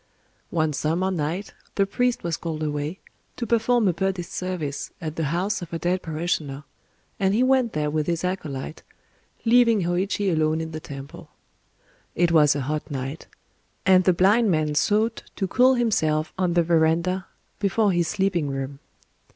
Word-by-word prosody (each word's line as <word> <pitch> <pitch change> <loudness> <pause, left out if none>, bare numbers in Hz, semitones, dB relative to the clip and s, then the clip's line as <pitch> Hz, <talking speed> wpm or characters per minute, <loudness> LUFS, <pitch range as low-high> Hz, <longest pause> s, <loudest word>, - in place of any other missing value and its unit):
One 160 -2 0
summer 165 +6 0
night 170 +3 -3 0.2
the 200 - +3
priest 245 +4 0
was 170 -1 -1
called 160 -2 -4
away, 150 +3 -2 0.4
to 240 - -3
perform 235 0 +2
a 180 - +3
Buddhist 190 0 -2
service 175 -6 -3
at 160 -3 -5
the 160 - -1
house 185 +8 -1
of 175 - -8
a - - 0
dead 175 +3 0
parishioner; 155 -3 -3 0.6
and 195 +1 +2
he 240 - +3
went 255 -3 +3
there 150 -1 -1
with 155 -1 -1
his 170 0 -1
acolyte, 155 -5 -4 0.6
leaving 230 -3 +5
Hōïchi 185 +2 0
alone 155 0 +1
in 160 0 -4
the 155 - -5
temple. 140 -2 -10 0.9
It 175 0 +2
was 150 -3 +5
a 145 - -1
hot 150 +4 -3
night; 135 +2 -5 0.6
and 185 -1 +6
the 185 - +6
blind 205 +6 +4
man 155 -3 +1
sought 215 +9 +1
to 195 - -1
cool 255 +6 +4
himself 160 -10 +1
on 185 -2 0
the 170 - +4
verandah 170 +3 +1 0.3
before 205 +1 +2
his 175 -2 +1
sleeping 185 -7 0
room. 135 0 -4
175 Hz, 165 wpm, -24 LUFS, 155-195 Hz, 0.9 s, and